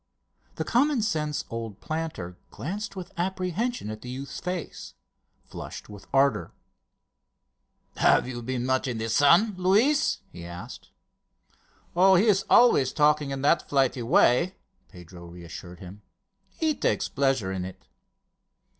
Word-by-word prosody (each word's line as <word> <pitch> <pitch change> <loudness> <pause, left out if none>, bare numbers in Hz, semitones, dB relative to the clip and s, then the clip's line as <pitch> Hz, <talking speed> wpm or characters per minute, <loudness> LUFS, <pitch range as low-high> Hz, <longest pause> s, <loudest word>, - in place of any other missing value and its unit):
The - - -2
common 265 -1 +2
sense 155 -8 -2
old 115 -3 -6
planter 155 - -5
glanced 200 +6 -5
with 185 -2 -8
apprehension 185 - -2
at 110 0 -8
the 125 - -9
youth's 135 +2 -6
face, 180 -2 -6 0.5
flushed - - -9
with 100 -1 -12
ardour. 135 -5 +2 1.4
"Have - - +4
you 120 -2 -5
been 125 0 -3
much 130 +1 0
in 120 -3 -3
the 110 +1 -3
sun, 170 - +4
Luis?" 215 +11 +2
he 85 - -10
asked. 90 +8 -9 1.1
"Oh, 190 +2 +6
he 190 +5 +4
is 195 -3 +3
always 145 - +5
talking 150 -1 +2
in 135 0 -4
that 155 +2 +2
flighty 135 -2 +1
way," 125 +9 +3 0.3
Pedro 90 0 -13
reassured 85 +1 -10
him. 95 +3 -11 0.5
"He 310 +11 -1
takes - - 0
pleasure 135 -8 0
in 95 -1 -3
it." 95 0 -9
140 Hz, 135 wpm, -26 LUFS, -, 1.4 s, Oh